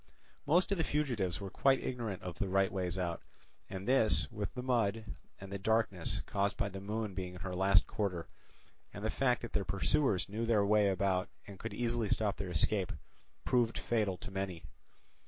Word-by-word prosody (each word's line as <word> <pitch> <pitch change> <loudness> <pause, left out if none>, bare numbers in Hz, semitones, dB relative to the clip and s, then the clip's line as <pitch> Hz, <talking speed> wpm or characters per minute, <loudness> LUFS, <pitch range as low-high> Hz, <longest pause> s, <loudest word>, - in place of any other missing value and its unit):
Most 175 +6 +4
of 200 - +1
the - - +3
fugitives 120 - 0
were 100 -2 -6
quite 135 +3 +3
ignorant 115 -7 -3
of 90 -1 -6
the 100 - -1
right 95 0 +3
ways 90 -1 -2
out, 85 -2 -2 0.5
and 95 +2 -6
this, 125 -4 +3
with 105 -3 -3
the 125 - -4
mud, 115 -4 +1 0.3
and 95 0 -9
the 100 - -3
darkness 105 -4 +1
caused 100 0 0
by 105 -3 0
the 95 0 -7
moon 105 0 -3
being 90 -1 -5
in 90 - -9
her 95 -1 -4
last 95 0 +4
quarter, 95 -6 -2 0.6
and 100 +2 -6
the 110 - +1
fact 125 -3 +1
that 120 - -6
their 100 - +1
pursuers 95 - +1
knew 110 +3 -3
their 105 -3 +4
way 105 0 +4
about 95 -1 +1 0.2
and 100 -3 -11
could 110 - -5
easily 120 -3 0
stop 105 -2 +1
their 95 -2 -4
escape, 90 +3 +1 0.5
proved 120 -2 +2
fatal 105 -5 0
to 95 - -8
many. 95 -3 -3
100 Hz, 190 wpm, -34 LUFS, 95-115 Hz, 0.6 s, Most